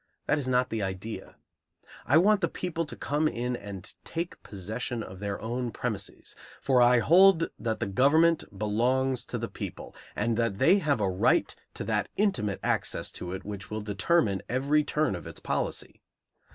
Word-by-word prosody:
That 145 Hz, -, +2 dB
is 135 Hz, -, -4 dB
not 125 Hz, 0 st, +2 dB
the 110 Hz, -1 st, -1 dB
idea. 95 Hz, +3 st, -5 dB, 0.7 s
I 140 Hz, -, +5 dB
want 205 Hz, +4 st, +4 dB
the 170 Hz, -, +2 dB
people 165 Hz, -2 st, -3 dB
to -, -, -7 dB
come 150 Hz, +2 st, 0 dB
in 125 Hz, -3 st, -2 dB
and 100 Hz, -3 st, -7 dB
take 170 Hz, +1 st, -5 dB
possession 110 Hz, +4 st, -5 dB
of 95 Hz, -2 st, -10 dB
their 100 Hz, -1 st, -3 dB
own 120 Hz, +3 st, -3 dB
premises; -, -, -5 dB, 0.2 s
for 130 Hz, -2 st, +3 dB
I 120 Hz, 0 st, +6 dB
hold 170 Hz, -, +5 dB
that 110 Hz, -1 st, -2 dB
the -, -, -1 dB
government 150 Hz, +11 st, +3 dB
belongs 125 Hz, +5 st, +1 dB
to -, -, -4 dB
the -, -, -3 dB
people, -, -, -7 dB, 0.2 s
and 115 Hz, +1 st, 0 dB
that 115 Hz, -4 st, 0 dB
they 160 Hz, -, +5 dB
have 145 Hz, -, +1 dB
a 100 Hz, -, +2 dB
right 95 Hz, 0 st, +2 dB, 0.2 s
to -, -, -4 dB
that -, -, -1 dB
intimate 190 Hz, -, 0 dB
access -, -, 0 dB
to 90 Hz, -, -6 dB
it 95 Hz, -, -6 dB
which 100 Hz, -2 st, -7 dB
will 110 Hz, 0 st, -3 dB
determine 105 Hz, -, +1 dB
every 140 Hz, +4 st, +2 dB
turn 150 Hz, -3 st, 0 dB
of 90 Hz, -, -6 dB
its -, -, -8 dB
policy. -, -, -3 dB
125 Hz, 180 wpm, -28 LUFS, 105-150 Hz, 0.7 s, I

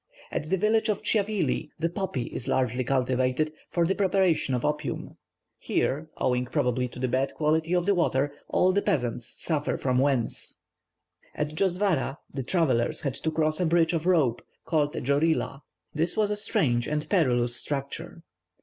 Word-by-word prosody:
At 150 Hz, -, -3 dB
the 190 Hz, -, +2 dB
village 220 Hz, +3 st, +2 dB
of 210 Hz, -, -1 dB
Tchiavli, 205 Hz, -7 st, +1 dB
the 165 Hz, -, 0 dB
poppy 175 Hz, -, -3 dB
is 120 Hz, -, -5 dB
largely 130 Hz, 0 st, +1 dB
cultivated 130 Hz, +3 st, +1 dB, 0.2 s
for 170 Hz, -1 st, +1 dB
the 185 Hz, -, +2 dB
preparation 190 Hz, -8 st, +2 dB
of 125 Hz, -, -2 dB
opium; 150 Hz, 0 st, -3 dB, 0.4 s
here, 155 Hz, +4 st, -1 dB
owing 125 Hz, 0 st, +1 dB
probably, 125 Hz, -3 st, 0 dB
to 120 Hz, -, -12 dB
the 130 Hz, +1 st, -1 dB
bad 130 Hz, +2 st, 0 dB
quality 160 Hz, +3 st, +1 dB
of 175 Hz, -1 st, +1 dB
the 200 Hz, -, +3 dB
water, 145 Hz, -5 st, +1 dB
all 185 Hz, -, +3 dB
the 200 Hz, +2 st, +1 dB
peasants 120 Hz, -, -1 dB
suffer 155 Hz, -3 st, -2 dB
from 125 Hz, -1 st, +1 dB
wens. 135 Hz, -4 st, 0 dB, 0.8 s
At 150 Hz, -, -1 dB
Djosvara 175 Hz, -5 st, 0 dB, 0.2 s
the 135 Hz, -, -3 dB
travellers 145 Hz, -1 st, +1 dB
had 140 Hz, -5 st, -2 dB
to 160 Hz, -, -3 dB
cross 155 Hz, 0 st, +1 dB
a 180 Hz, -, +2 dB
bridge 165 Hz, 0 st, +3 dB
of 165 Hz, +1 st, -1 dB
rope, 145 Hz, -10 st, +3 dB, 0.2 s
called 150 Hz, -3 st, +1 dB
a -, -, -3 dB
"djorila." 140 Hz, +1 st, +1 dB, 0.3 s
This 165 Hz, +3 st, 0 dB
was 210 Hz, -1 st, +2 dB
a -, -, +1 dB
strange 120 Hz, -, +1 dB
and 150 Hz, 0 st, -2 dB
perilous 125 Hz, -, +2 dB
structure. 150 Hz, +6 st, -3 dB
155 Hz, 165 wpm, -27 LUFS, 130-175 Hz, 0.8 s, the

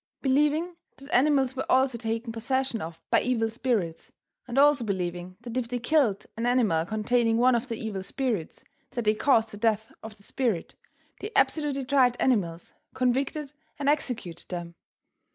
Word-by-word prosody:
Believing 300 Hz, +6 st, +2 dB, 0.2 s
that 275 Hz, +2 st, -10 dB
animals 270 Hz, -1 st, +3 dB
were 265 Hz, -, -3 dB
also 260 Hz, -1 st, +3 dB
taken 230 Hz, 0 st, -3 dB
possession 260 Hz, 0 st, -1 dB
of 165 Hz, 0 st, -7 dB
by -, -, +5 dB
evil 225 Hz, -3 st, 0 dB
spirits 225 Hz, -9 st, -2 dB, 0.4 s
and 245 Hz, +1 st, -5 dB
also 285 Hz, -2 st, +5 dB
believing 180 Hz, -3 st, -3 dB
that 235 Hz, -1 st, -7 dB
if 250 Hz, -2 st, -1 dB
they 245 Hz, +1 st, -2 dB
killed 245 Hz, -5 st, +1 dB
an 230 Hz, +2 st, -1 dB
animal 215 Hz, -10 st, +2 dB
containing 225 Hz, +2 st, +1 dB
one 250 Hz, +2 st, +5 dB
of 235 Hz, +1 st, 0 dB
the 230 Hz, -, -3 dB
evil 215 Hz, -3 st, -4 dB
spirits 220 Hz, -, -3 dB, 0.3 s
that 240 Hz, -2 st, -3 dB
they 215 Hz, -, +4 dB
caused 225 Hz, -1 st, +2 dB
the 205 Hz, -, -8 dB
death 220 Hz, 0 st, 0 dB
of 220 Hz, -1 st, -10 dB
the 200 Hz, -, -20 dB
spirit, 225 Hz, -7 st, -2 dB, 0.5 s
they 415 Hz, -, -5 dB
absolutely 285 Hz, -4 st, +1 dB
tried 255 Hz, -2 st, +3 dB
animals, 175 Hz, -10 st, 0 dB, 0.2 s
convicted 270 Hz, +3 st, 0 dB, 0.2 s
and 280 Hz, -1 st, -3 dB
executed 245 Hz, -, -2 dB
them. 175 Hz, -2 st, -5 dB
240 Hz, 165 wpm, -27 LUFS, 215-265 Hz, 0.5 s, by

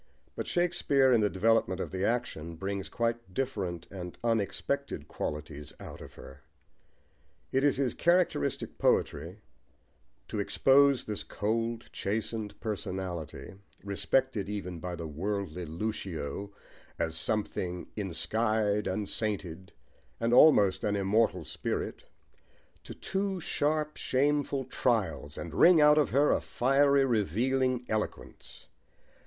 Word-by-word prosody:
But -, -, -4 dB
Shakespeare, 160 Hz, -7 st, +3 dB
in 115 Hz, -, +4 dB
the 105 Hz, -, +3 dB
development 95 Hz, -2 st, +2 dB
of -, -, -4 dB
the 95 Hz, 0 st, -3 dB
action, 85 Hz, -8 st, -2 dB
brings 95 Hz, +3 st, -4 dB
quite 115 Hz, -5 st, -2 dB
different 100 Hz, -11 st, -2 dB
and 90 Hz, -2 st, -7 dB
unexpected 115 Hz, -4 st, -1 dB
qualities 75 Hz, -1 st, -5 dB
out -, -, -9 dB
of -, -, -11 dB
her. 65 Hz, -, -12 dB, 1.1 s
It 135 Hz, +1 st, +2 dB
is 145 Hz, -3 st, +3 dB
his 135 Hz, -2 st, 0 dB
characteristic 175 Hz, -, +1 dB
poetry 90 Hz, +6 st, 0 dB, 0.9 s
to 105 Hz, -, -4 dB
expose 135 Hz, +6 st, +4 dB
this 105 Hz, -1 st, -4 dB
cold, 115 Hz, +2 st, -2 dB
chastened 105 Hz, 0 st, -3 dB
personality, 95 Hz, -6 st, -5 dB, 0.3 s
respected 105 Hz, +2 st, 0 dB
even 90 Hz, -4 st, -4 dB
by 90 Hz, +1 st, -4 dB
the 85 Hz, -1 st, -6 dB
worldly 90 Hz, +1 st, -3 dB
Lucio 100 Hz, 0 st, -4 dB, 0.5 s
as 80 Hz, 0 st, -1 dB
"something 90 Hz, -1 st, -2 dB
ensky'd 105 Hz, +2 st, 0 dB
and 105 Hz, -2 st, -2 dB
sainted, 95 Hz, -5 st, -3 dB, 0.5 s
and 115 Hz, +1 st, +1 dB
almost 105 Hz, -9 st, +6 dB
an 105 Hz, -1 st, +1 dB
immortal 100 Hz, -3 st, +1 dB
spirit," -, -, -4 dB, 0.8 s
to -, -, -8 dB
two 195 Hz, -1 st, -2 dB
sharp, 150 Hz, -2 st, -1 dB
shameful 140 Hz, 0 st, +1 dB
trials, 105 Hz, -, -1 dB
and 85 Hz, -3 st, -6 dB
wring 170 Hz, -, +7 dB
out 150 Hz, 0 st, +6 dB
of 150 Hz, -, +2 dB
her 145 Hz, +2 st, +3 dB
a -, -, +2 dB
fiery, 140 Hz, +2 st, +3 dB
revealing 125 Hz, +4 st, +1 dB
eloquence. 110 Hz, -1 st, -5 dB
105 Hz, 120 wpm, -30 LUFS, 95-130 Hz, 1.1 s, wring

